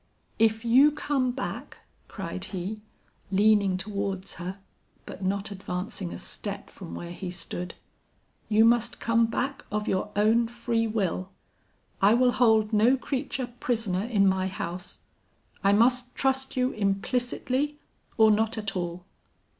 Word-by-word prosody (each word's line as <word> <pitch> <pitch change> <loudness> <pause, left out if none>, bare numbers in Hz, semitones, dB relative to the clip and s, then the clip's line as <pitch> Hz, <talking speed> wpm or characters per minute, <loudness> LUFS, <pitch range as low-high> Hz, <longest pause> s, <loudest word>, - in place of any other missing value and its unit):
"'If 225 +1 +3
you 265 +6 +6
come 285 -3 0
back,' 255 +1 -5 0.3
cried - - -6
he, 195 +3 -5 0.5
leaning 200 -1 +4
towards 195 -1 -4
her, 185 +3 -5 0.5
but 190 - -8
not 200 +2 -1
advancing 190 0 -4
a - - -6
step 200 -1 -6
from 185 -4 -9
where 170 0 -6
he 180 +1 -6
stood, 175 0 -6 0.7
'you 220 +1 +5
must 235 0 +3
come 230 0 +3
back 270 +4 -2
of 210 +1 -2
your 190 +2 0
own 220 +3 +3
free 230 -1 -1
will. 190 -4 -1 0.7
I 205 +3 +6
will 250 0 +4
hold 220 -3 +3
no 230 +5 +5
creature 260 -2 -3
prisoner 220 -7 0
in 215 -4 +2
my 190 -1 +2
house. 180 -1 -5 0.6
I 195 - +5
must 245 +4 +3
trust 265 -1 0
you 255 +1 +2
implicitly, 250 +7 -1 0.4
or 220 -1 +7
not 220 +2 +1
at 210 -2 -3
all. 175 0 -4
215 Hz, 140 wpm, -27 LUFS, 195-240 Hz, 0.7 s, or